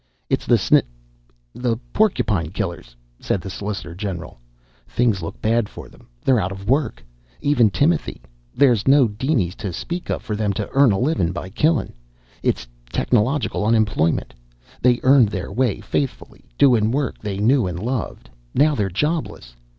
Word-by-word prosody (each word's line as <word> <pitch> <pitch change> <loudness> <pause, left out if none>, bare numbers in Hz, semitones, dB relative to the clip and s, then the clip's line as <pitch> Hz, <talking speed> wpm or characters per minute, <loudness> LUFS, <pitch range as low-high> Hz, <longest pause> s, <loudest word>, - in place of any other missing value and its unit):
"It's - - 0
the - - +5
sn... - - +4 0.7
the 120 -2 -1 0.2
porcupine 110 - +1
killers," 85 - -5 0.2
said - - -1
the 95 +1 -7
solicitor 100 -4 -5
general. 90 - -6 0.5
"Things 115 -6 +1
look 80 - -7
bad 115 -1 +1
for - - -11
them. - - -20 0.2
They're 130 -3 +4
out 95 -1 -1
of 100 0 -8
work. 130 - 0 0.3
Even 130 -7 +3
Timothy. 150 - 0 0.4
There's 125 -6 +3
no 135 -2 +6
dinies 110 - -1
to 105 -4 -4
speak 170 - -5
of - - -2
for 105 - -3
them 105 -1 0
to - - -3
earn 135 -3 +5
a 95 - +1
livin' 125 - +1
by 95 +1 -6
killin'. 155 - +1 0.5
It's - - -1 0.2
technological 125 - +1
unemployment. 105 -7 +1 0.5
They 125 0 +4
earned 130 -4 +6
their 95 -2 -5
way 120 -1 0
faithful, 140 -3 -3 0.2
doin' 115 -6 +4
work 140 +2 -1
they 100 -2 -4
knew 115 +2 +3
an' 90 -1 -4
loved. 120 +4 -4 0.3
Now 150 +3 +4
they're 105 -7 0
jobless. 125 - -3
110 Hz, 160 wpm, -21 LUFS, 95-135 Hz, 0.7 s, no